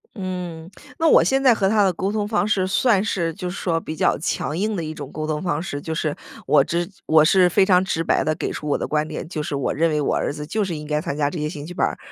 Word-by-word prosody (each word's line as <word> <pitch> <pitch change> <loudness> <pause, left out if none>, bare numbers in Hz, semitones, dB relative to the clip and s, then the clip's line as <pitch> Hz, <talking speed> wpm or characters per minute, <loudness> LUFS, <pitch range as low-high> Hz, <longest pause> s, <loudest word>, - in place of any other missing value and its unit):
嗯， 180 -4 -5 0.3
那 325 - +3
我 - - +6
现 270 0 +1
在 250 -4 +6
和 195 - +1
他 210 +1 +3
的 190 - +3
沟 190 +2 -2
通 210 -1 -1
方 210 -1 +1
式 190 -3 +1
算 200 0 +3
是 170 -6 -1
就 180 +2 -5
是 175 - -6
说 165 -3 0
比 155 - -6
较 - - +2
强 145 -2 -2
硬 210 +5 -1
的 170 - -3
一 155 0 -5
种 145 -3 -8
沟 155 0 -4
通 155 -1 -2
方 170 -4 -1
式。 145 -5 -5
就 160 +1 -4
是 155 -2 -1 0.3
我 - - +5
只 170 0 -1 0.2
我 155 -1 +6
是 180 +2 +5
非 195 +2 +4
常 185 -2 +4
直 165 -3 -1
白 - - +1
地 155 0 0
给 - - -3
出 150 - -6
我 145 - +1
的 - - -3
观 150 0 0
点， 155 0 -6
就 160 -3 -4
是 150 - -3
我 140 - -1
认 165 +2 +2
为 150 -1 0
我 145 - 0
儿 - - -1
子 150 +1 -6
就 210 +7 -1
是 180 -4 -3
应 150 0 -7
该 150 0 -1
参 155 -4 -4
加 145 -1 +1
这 170 - -5
些 150 0 -2
兴 145 -3 -7
趣 180 - -8
班 - - +1
儿。 - - -5
170 Hz, 320 characters per minute, -22 LUFS, 155-190 Hz, 0.3 s, 我